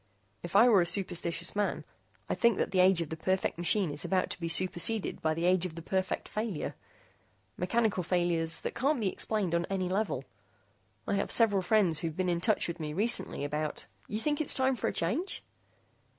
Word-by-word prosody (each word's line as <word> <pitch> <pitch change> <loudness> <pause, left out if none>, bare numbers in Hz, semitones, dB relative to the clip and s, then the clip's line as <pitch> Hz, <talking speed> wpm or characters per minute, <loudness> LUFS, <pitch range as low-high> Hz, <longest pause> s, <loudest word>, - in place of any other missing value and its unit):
If 175 +2 -8
I 225 +5 +7
were 210 -6 +6
a - - +1
superstitious 170 -2 -1
man, 205 0 -1 0.4
I'd - - -3
think 235 -3 +4
that - - -1
the 190 - +1
age 185 -1 +5
of 155 - -10
the 160 - -4
perfect 185 +1 -1
machine 175 0 +1
is 145 0 -2
about 185 -1 0
to - - -5
be 165 -1 -3
superseded 185 +5 +1
by 155 0 0
the 165 +2 -2
age 180 -1 +3
of 160 - -12
the 165 - -7
perfect 190 +2 -2
failure 215 -7 -3 0.8
mechanical 205 +1 0
failures 170 -2 +1
that - - -4
can't 275 +2 0
be 205 -4 +1
explained 200 -3 -2
on 170 0 +1
any 185 -2 -1
level. 185 -9 -1 0.8
I - - 0
have 200 - -1
several 205 -5 +4
friends 185 -5 +2
who've 165 0 -4
been 185 -1 0
in 170 -1 0
touch 215 +2 +2
with 170 0 -5
me 150 -1 -4
recently 215 -4 0
about 150 +1 -3
" - - -33
"You 210 - -3
think 295 +4 -1
that 310 - 0
it's - - +4
time 260 0 +2
for 220 - -2
a - - 0
change?" 255 - -2
185 Hz, 210 wpm, -30 LUFS, 170-215 Hz, 0.8 s, I